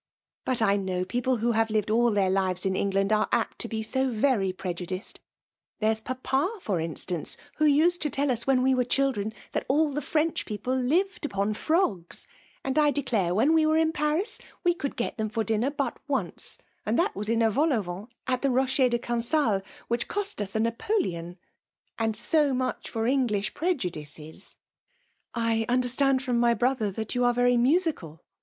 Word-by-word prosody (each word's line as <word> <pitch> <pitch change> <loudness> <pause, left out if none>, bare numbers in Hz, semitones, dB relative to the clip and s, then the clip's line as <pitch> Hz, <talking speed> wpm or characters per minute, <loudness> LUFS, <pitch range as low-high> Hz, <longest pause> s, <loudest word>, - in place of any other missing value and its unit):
"But 250 -3 +1
I 200 -1 +3
know 185 -2 -2
people 245 +5 0
who 235 +2 +1
have 225 0 +2
lived 215 0 0
all 235 +2 +4
their 200 -3 +2
23d - - +1
rEsc^^JE 190 -1 +2
ocufUULTiaN; - - -3
Kteft 185 - -5
in 190 -1 +1
England 195 +1 +1
ace 215 0 +3
apt 235 -2 0
to - - -3
be 225 - -4
ao 265 +4 0
vefy 215 -5 +1
pr^u*. 180 -2 -4
diced! 185 +4 -6 0.6
There*6 220 0 +1 0.2
^^^^ 310 - 0
for 195 - -1
instance/ 165 +1 -3 0.2
vfbo 305 -1 +5
vsadL 350 +3 +3
to 300 - 0
tell 280 0 0
us 235 -1 -2
^vhen 260 -2 +3
we 265 0 +4
were 255 -1 +2
children^ 245 -5 0 0.2
that - - -2
all 295 +1 +2
thd 295 - -1
Frencli 315 +2 0
people 235 +5 -2
lived 330 +12 0
upon 200 -6 -1
frogs; 210 - 0 0.4
and 270 +3 0
I 300 -1 +5
declare 225 -11 0
when 250 +9 +4
I 320 -1 +4
was 315 0 +3
in 320 0 +2
Paris 305 +7 -1 0.2
we 350 - +4
could 285 -5 -4
get 240 - -3
them 215 0 -1
for 220 +1 -1
dinner 225 +4 +1
but 280 -4 -3
once; 255 - 0 0.3
and 215 +3 0
that 380 +5 +1
was 210 +1 -3
in 230 0 +2
a 225 - +3
vol 300 +8 +2
au 235 -5 +2
vent 180 +5 -7 0.2
at 255 -1 0
the 275 - +2
Eocher 260 0 +2
de 240 - +1
Cancale, 235 -2 +1 0.3
which 235 0 -1
<K)st 410 - 0
us 195 -1 -4
d' 220 - +2
Napoleon: 210 - -2 0.6
and 220 -1 0
&o 295 -4 +4
much 255 0 -2
for 225 -1 -2
English 235 -6 +1
preju*^ 315 - -1
dices! 155 +3 -7 0.3
' 485 0 -43 0.2
" - - -50
I 230 -1 +1
understand 255 +2 +2
from 245 -3 0
my 235 0 +4
brother 245 -4 +1
that 220 +2 -4
you' 245 -1 +1
are 245 0 +3
very 245 0 +3
musical? 255 - 0
240 Hz, 205 wpm, -27 LUFS, 210-275 Hz, 0.6 s, vfbo